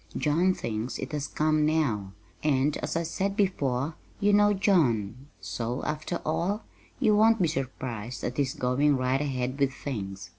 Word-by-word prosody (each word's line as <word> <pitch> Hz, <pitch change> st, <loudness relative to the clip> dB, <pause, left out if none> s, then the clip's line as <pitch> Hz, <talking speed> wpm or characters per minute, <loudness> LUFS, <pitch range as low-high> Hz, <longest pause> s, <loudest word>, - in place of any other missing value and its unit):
John 170 Hz, +5 st, +2 dB
thinks 110 Hz, +2 st, -3 dB
it 135 Hz, -, -5 dB
has 150 Hz, -1 st, -2 dB
come 155 Hz, 0 st, +1 dB
now; 125 Hz, -11 st, 0 dB, 0.3 s
and, 145 Hz, 0 st, +2 dB
as -, -, -4 dB
I 165 Hz, -, +1 dB
said 195 Hz, +4 st, -2 dB
before, 145 Hz, -7 st, 0 dB, 0.3 s
you 205 Hz, +1 st, +3 dB
know 205 Hz, 0 st, +5 dB
John, 135 Hz, -, +1 dB
so, 120 Hz, +2 st, -4 dB
after 155 Hz, +3 st, -3 dB
all, 175 Hz, +7 st, 0 dB, 0.4 s
you 220 Hz, -5 st, +4 dB
won't 225 Hz, +1 st, +5 dB
be 175 Hz, -, +3 dB
surprised 130 Hz, -5 st, -4 dB
at 125 Hz, -, -3 dB
his 140 Hz, -2 st, 0 dB
going 135 Hz, +3 st, +2 dB
right 130 Hz, +2 st, +1 dB
ahead 130 Hz, -1 st, -2 dB
with 140 Hz, -1 st, +3 dB
things. 100 Hz, -9 st, -6 dB
145 Hz, 160 wpm, -28 LUFS, 125-170 Hz, 0.4 s, know